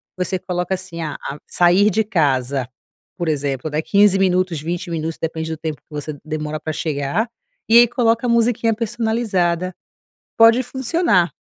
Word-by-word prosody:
Você 185 0 -1
coloca, 180 0 -2
assim, 180 -3 -8
a 150 -3 -4
a 145 +2 -7
sair 180 +4 +4
de 220 +3 +1
casa, 135 - 0 0.5
por 175 -2 -3
exemplo, 140 -2 -1
né, 155 +1 0
15 200 +1 +4
minutos, 180 -4 +1
20 175 +2 -4
minutos, 160 0 -3
depende 160 0 -3
do 160 - -4
tempo 155 -2 -5
que - - -58
você 150 0 -5
demora 155 0 -4
pra 155 - -4
chegar, 150 - -1 0.4
e 230 +1 +6
aí 240 - +7
coloca 230 0 +1
a - - 0
musiquinha 235 -1 +2
personalizada, 215 -6 -1 0.6
pode 230 +2 +6
funcionar. 260 - +1
180 Hz, 160 wpm, -20 LUFS, 155-220 Hz, 0.6 s, aí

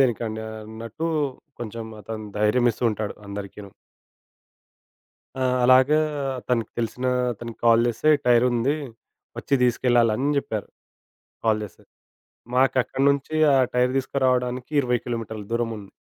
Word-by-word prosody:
దేనికండి 115 -3 0 0.2
అన్నట్టు, 115 +8 -6 0.5
కొంచెం 115 0 -6
అతను 110 +1 -7
ధైర్యం 105 +4 +3
ఇస్తూ 120 - -5
ఉంటాడు 105 0 -4
అందరికీను. 100 0 -8 1.6
ఆ! 130 - -2 0.2
అలాగా 130 +4 +6 0.5
తనకి 120 -3 0
తెలిసిన 125 +2 -2 0.3
అతనికి 115 +1 -9
కాల్ 115 0 +6
చేస్తే, 135 +7 +1 0.2
టైరుంది 120 +3 +3 0.6
వచ్చి 140 - 0
తీసుకెళ్లాలని 120 0 +2
అని 145 - +1
చెప్పారు. 110 -6 -4 0.8
కాల్ 110 -1 +2
చేస్తే. 100 - -16 0.7
మాకు 130 +1 +3
అక్కడి 135 - -2
నుంచి 140 +2 -1 0.2
ఆ - - +5 0.2
టైర్ 125 0 +2
తీసుకురావడానికి 130 -1 0
20 125 -1 +1
కిలోమీటర్ల 115 -3 -4
దూరముంది. 115 -4 -3
120 Hz, 115 wpm, -24 LUFS, 110-130 Hz, 1.6 s, అలాగా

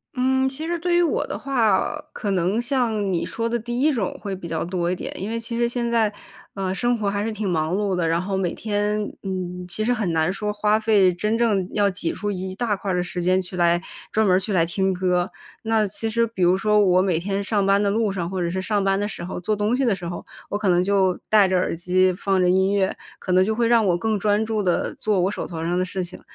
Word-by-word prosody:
嗯。 260 +1 +2
其 285 +5 -4
实 345 0 -1
对 345 +1 0
于 350 - +4
我 340 - +1
的 - - -5
话 240 -8 +2
呃， 300 +10 -2
可 210 - -4
能 190 +5 +1
像 230 -6 0
你 170 - 0
说 230 0 -3
的 240 - 0
第 240 +2 -3
一 305 +2 +4
种 225 -9 -2
会 200 -2 -4
比 180 -2 -8
较 160 -1 -2
多 175 0 -1
一 - - 0
点， - - -6
因 195 - -4
为 230 +1 -2
其 230 +1 -5
实 235 0 +2
现 235 0 -2
在， 225 -3 +2 0.4
呃， 190 -1 -2
生 240 +3 +1
活 205 - 0
还 200 +1 -1
是 225 - -2
挺 210 -2 -3
忙 160 +1 0
碌 200 -1 0
的， 175 -2 0
然 165 +1 +1
后 190 +1 -2
每 180 -3 -1
天 210 0 -1
嗯， 180 -1 -4
其 200 +4 -2
实 235 - +1
很 215 -8 0
难 160 +2 +2
说 210 +2 -3
花 210 +1 +2
费 210 -4 +4
真 210 +5 -1
正 215 -6 +1
要 205 -1 +3
挤 185 -3 -2
出 205 - -3
一 185 -1 -4
大 215 +1 -1
块 195 0 -4
儿 - - 0
的 180 - +1
时 180 0 -4
间 185 +1 +3
去 180 0 -5
来 175 0 +3 0.3
专 220 -1 +2
门 185 0 +4
去 200 +2 -2
来 175 -3 +4
听 190 +3 0
歌。 180 0 0 0.3
那 220 -2 +2
其 220 +3 -3
实 230 +1 +2
比 215 -5 -3
如 175 +1 +5
说 210 +2 +2
我 185 -3 +4
每 185 -4 +1
天 195 +3 -2
上 205 -1 0
班 195 +1 +3
的 205 - +2
路 215 0 +1
上， 175 -3 -3
或 190 0 -3
者 170 -1 -1
是 185 +1 -2
上 205 +1 0
班 195 0 +2
的 205 - -1
时 185 -4 -6
候， 180 - -5
做 210 +4 -1
东 210 +3 +1
西 270 - 0
的 230 -6 +2
时 180 -2 -9
候， 175 - -5 0.3
我 205 - -1
可 205 -3 +1
能 175 0 +3
就 190 -2 +2
戴 210 -3 +6
着 185 0 +1
耳 180 - 0
机 185 +2 +2
放 190 +1 0
着 180 - +3
音 190 +2 +3
乐， 195 -2 +1 0.2
可 185 - -5
能 185 +1 +5
就 220 +3 0
会 235 0 +2
让 230 -1 +4
我 175 - +2
更 220 +2 -1
专 210 +1 +1
注 220 -1 -1
地 180 -3 0
做 210 -3 0
我 185 +2 +1
手 - - -4
头 165 -2 -5
上 175 +2 0
的 - - +2
事 185 0 -3
情。 175 - -10
200 Hz, 295 characters per minute, -23 LUFS, 185-220 Hz, 0.4 s, 戴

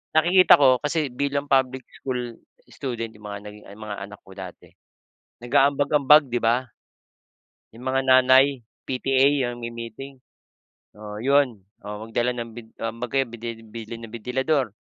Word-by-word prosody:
nakikita 175 +4 +6
ko 130 -3 +4
kasi 150 -2 -1
bilang 140 +2 -1
public 130 -1 +2 0.2
school 125 -3 -4 0.3
student 120 -3 -5
yung 105 -1 -13
mga 100 -1 -6
naging 105 0 -15
mga 105 -1 -7
anak 105 0 -13
ko 95 - -17
dati, 95 -2 -10 0.7
nag-aambag-ambag, 140 +4 +4
di 120 - 0
ba? 120 +3 +2 1.1
Yung 115 +2 -13
mga 135 0 +1
nanay, 130 +1 +5 0.2
PTA, 135 +1 +2
yung 120 -1 -7
may 120 - -5
meeting 115 +4 -9 0.8
oo, 105 0 -8
'yon. 135 -3 +2 0.3
Oo, 105 +1 -7
magdala 120 +2 0
ng 120 -1 -6
bin 120 -1 -10
um, 115 0 -3
'baga 135 +3 0
bidi 115 0 -7
bili 115 +1 -8
ng 115 - -9
bentilador. 125 +3 -1
125 Hz, 145 wpm, -24 LUFS, 115-135 Hz, 1.1 s, nakikita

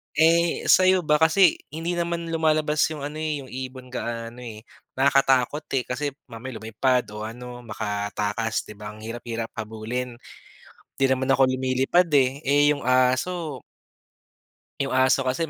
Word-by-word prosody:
Eh, 165 +2 +3
sa'yo 185 -1 +5
ba? 150 -1 +3
Kasi 165 +2 +4
hindi 165 +2 -3
naman 170 -1 -2
lumalabas 155 -2 +1
'yung 155 -3 -6
ano, 150 +2 -5
eh, 155 -2 -2
'yung 130 - -12
ibon 130 0 -7
gaano 115 -1 -5
eh. 110 -3 -9 0.3
Nakakatakot 135 +1 +2
eh, 125 - 0
kasi 135 +4 -3 0.2
mamaya 115 +1 -7
lumipad 125 +3 +1
o 105 - -6
ano 125 +2 -9
makatakas, 105 +1 -2
'di - - -10
ba 105 0 -8
ang 110 - -13
hirap-hirap 115 0 -5
habulin. 115 +3 -4 0.8
'Di 135 - +3
naman 130 0 0
ako 135 0 +5
lumilipad 130 +7 +2
eh, 135 +1 +2
eh, 145 +1 +5
yung 145 - -6
aso 130 +4 +1 1.2
'yung 140 -1 -1
aso 130 +1 +3
kasi 140 +5 -1
130 Hz, 145 wpm, -24 LUFS, 120-150 Hz, 1.2 s, sa'yo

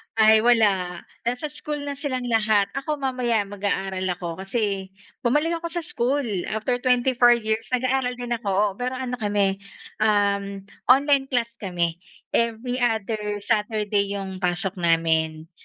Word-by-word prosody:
Ay, 220 0 +6
wala. 225 -3 +5 0.6
Nasa 245 +5 -1
school 300 0 -5
na 285 - -3
silang 260 -4 -2
lahat. 210 -2 +3
Ako 275 +3 -11 0.2
mamaya, 250 -4 +1
mag-aaral 195 -2 -2
ako. 175 0 -5
Kasi 195 +5 -2 0.6
bumalik 295 +7 +2
ako 335 - -4
sa 345 - -2
school 270 +4 +1 0.3
after 230 +3 0
24 250 -1 +5
years, 220 +1 0
nag-aaral 255 0 0
din 245 -1 -6
ako, 220 - -10
oo. 210 -1 +3
Pero 250 +1 -1
ano 255 -1 -3
kami, 205 -1 +2 0.6
uhm, 200 -2 +3 0.5
online 280 0 +2
class 235 -2 0
kami. 175 -3 -2 0.3
Every 235 +2 0
other 215 -3 -1
Saturday 210 -1 +1
'yong 195 -2 -4
pasok 180 +1 -1
namin. 160 -1 +1
220 Hz, 140 wpm, -24 LUFS, 200-250 Hz, 0.6 s, Ay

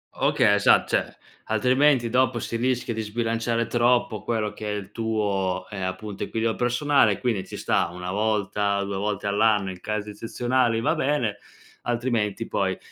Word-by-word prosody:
Okay, 100 - +3
esa 105 0 +5
cioè, - - -1 0.3
altrimenti 125 +3 +3
dopo 125 +1 +2
si 115 - -4
rischia 125 -1 0
di 110 - -3
sbilanciare 115 +1 -1
troppo 120 -2 +1
quello 110 -3 -2
che 105 - -7
è - - -2
il 100 -2 -7
tuo, 105 -5 -1
ehm, 95 -2 -5
appunto 100 +2 -5
equilibrio 115 0 -1
personale, 125 -3 +2
quindi 110 -6 -1
ci - - -7
sta - - +1
1 90 +1 -6
volta, 105 -1 0
2 100 -1 -4
volte 105 0 -2
all'anno 105 -1 +2
in 90 -1 -11
casi 105 -1 -3
eccezionali 120 +2 0
va - - +2
bene, 130 -7 0 0.5
altrimenti 120 -4 -1
poi, - - -1
110 Hz, 160 wpm, -25 LUFS, 105-120 Hz, 0.5 s, esa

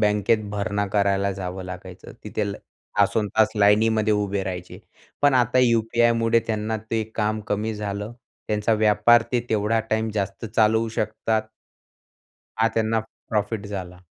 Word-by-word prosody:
बँकेत 105 +1 +2
भरणा 105 0 -1
करायला 100 -1 +2
जावं 95 0 -5
लागायचं. 90 0 -9
तिथे 105 - -2
ल - - -7 0.4
तासोंतास 105 +1 +3
लाईनीमध्ये 110 +1 +3
उभे 100 -1 -1
राहायचे. 90 -1 -6 0.4
पण 145 -1 +5
आता 125 0 +3
यू-पी-आयमुळे 115 -1 +3
त्यांना 110 0 -1
ते 115 -1 +1
काम 110 0 0
कमी 105 +2 -1
झालं, 105 +1 -4 0.4
त्यांचा 105 +1 +1
व्यापार 110 +2 +4
ते 125 - +2
तेवढा 110 +1 +1
टाईम 110 0 0
जास्त 100 0 -3
चालवू 110 +1 +2
शकतात. 110 0 -1 1.1
हा 115 - +4
त्यांना 110 0 +1 0.3
प्रॉफिट 105 -1 -1
झाला. 95 -3 -6
105 Hz, 130 wpm, -23 LUFS, 100-110 Hz, 1.1 s, पण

